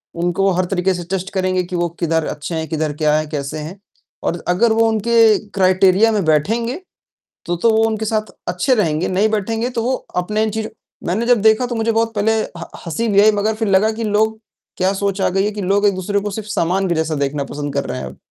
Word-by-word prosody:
उनको 175 +3 +1
हर 180 0 +1
तरीके 190 0 0
से 175 -1 -5
टेस्ट 190 0 -2
करेंगे 185 -1 0
कि 180 +1 -6
वो 175 -1 0
किधर 165 -2 0
अच्छे 150 +3 -5
हैं, 160 -1 -3
किधर 155 -2 -1
क्या 150 0 +4
है, 155 - -2
कैसे 145 -1 -4
हैं 165 +6 -8 0.4
और 170 - -2
अगर 205 +6 +3
वो 225 0 +3
उनके 225 0 +4 0.2
क्राइटेरिया 190 +3 +4
में 210 -4 0
बैठेंगे 230 - 0 0.6
तो, 175 - -1
तो 200 +7 +2
वो 220 0 +3
उनके 220 -1 -1
साथ 215 0 -1 0.2
अच्छे 180 +9 +1
रहेंगे, 165 -6 0
नहीं 195 +4 +1
बैठेंगे 225 +3 -1
तो 235 -2 -3
वो 255 +3 0 0.2
अपने 210 +4 0
इन 220 - 0
चीज़ों 220 0 -3 0.4
मैंने 200 +7 0
जब 245 -4 +4
देखा 220 +3 +4
तो 240 - -4
मुझे 225 0 +1
बहुत 225 0 0
पहले 210 +2 +2 0.2
ह - - -6 0.2
हँसी 170 +8 -2
भी 200 0 +5
आई 215 +1 +6
मगर 215 +1 0
फिर 220 -1 -2
लगा 200 +3 +3
कि 230 +1 -4
लोग 220 +1 +1 0.4
क्या 185 +1 +2
सोच 200 0 -2
आ - - +3
गई 195 +1 +1
है 210 - 0
कि 210 - -5
लोग 200 +2 +1
एक-दूसरे 200 +1 0
को 205 +1 -4
सिर्फ़ 215 +1 -6
सामान 190 0 0
के 170 - +1
जैसा 160 -1 -1
देखना 140 0 -1
पसंद 145 0 -5
कर 140 0 -1
रहे - - -4
हैं - - -5
अब। - - -11
195 Hz, 235 wpm, -18 LUFS, 175-220 Hz, 0.6 s, आई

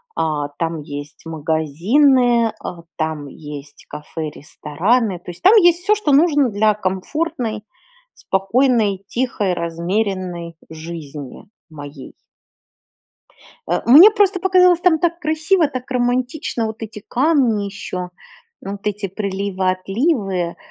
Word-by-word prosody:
а, 150 -2 -1
там 165 -1 -2
есть 145 +1 -9
магазины, 215 - +2
а, 170 -1 -7
там 155 -2 -3
есть 145 0 -11
кафе, 150 +1 -6
рестораны, 180 - -1
то 175 +1 -9
есть 175 - -14
там 385 +6 +6
есть 350 -4 +5
всё, 425 +2 +3
что 395 -9 -1
нужно 290 -3 +4
для 210 +1 +2
комфортной, 215 - -3 0.5
спокойной, 200 0 +1
тихой, 235 -6 -1
размеренной 175 0 -3
жизни 155 -4 -9 0.2
моей. 145 -3 -10 1.5
А, 175 - 0
мне 300 - +9
просто 405 -3 +2
показалось, 365 -1 +4
там 340 -4 +3
так 340 0 0
красиво, 315 +2 +1
так 255 -2 -7
романтично, 250 0 -1
вот 220 +1 -6
эти 215 -1 -8
камни 255 -7 +2
ещё, 185 -2 -6 0.5
вот 200 +1 -7
эти 205 -1 -2
приливы, 195 -1 -2
отливы, 195 - -1
200 Hz, 115 wpm, -19 LUFS, 170-265 Hz, 1.5 s, мне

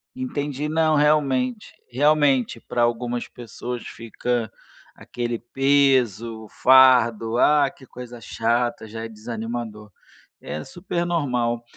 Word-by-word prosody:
Entendi, 150 - -3
não, 155 0 +2
realmente. 150 - +1 0.2
Realmente, 140 -2 +2
para 120 - -3
algumas 120 +1 -1
pessoas 120 0 -7
fica 115 +1 -3 0.4
aquele 120 -1 -5
peso, 125 -4 +1
o 105 - -14
fardo: 120 -3 +4
"Ah 145 +1 +4
que 130 - -17
coisa 125 -1 -10
chata", 115 +1 -1
já 115 +1 -6
é - - -5
desanimador. 110 -1 -6 0.5
É 75 - -6
super 175 -1 -4
normal. 125 -8 -1
125 Hz, 110 wpm, -23 LUFS, 115-145 Hz, 0.5 s, fardo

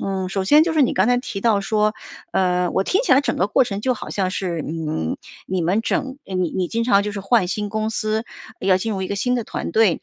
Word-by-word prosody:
嗯， 190 -1 -2
首 195 0 -1
先 295 +10 +6
就 335 - -1
是 315 - +2
你 255 - +2
刚 190 +3 +3
才 245 - +4
提 205 -5 -5
到 220 -3 +3
说 210 +1 +1 0.4
呃， 180 -1 +1
我 - - +1
听 390 +6 +1
起 - - +3
来 270 - +6
整 285 - -2
个 190 - +2
过 220 - +4
程 200 -4 -4
就 255 +3 +1
好 - - -8
像 190 -2 -1
是， 175 -5 -3
嗯， 155 - -3 0.3
你 185 -1 -1
们 185 +6 +1
整 265 +3 -2
呃， 190 - -6
你 180 -3 0
你 185 -1 -1
经 230 0 -1
常 200 -4 +4
就 210 - -3
是 200 - -5
换 195 -1 +2
新 210 +2 -2
公 215 +1 -2
司， 215 +1 -1 0.4
呃， - - -4
要 185 - +6
进 220 +4 -2
入 190 -2 -3
一 185 - -2
个 - - -2
新 250 +5 0
的 240 - -1
团 - - -4
队， 220 -6 +3
200 Hz, 295 characters per minute, -21 LUFS, 185-230 Hz, 0.4 s, 先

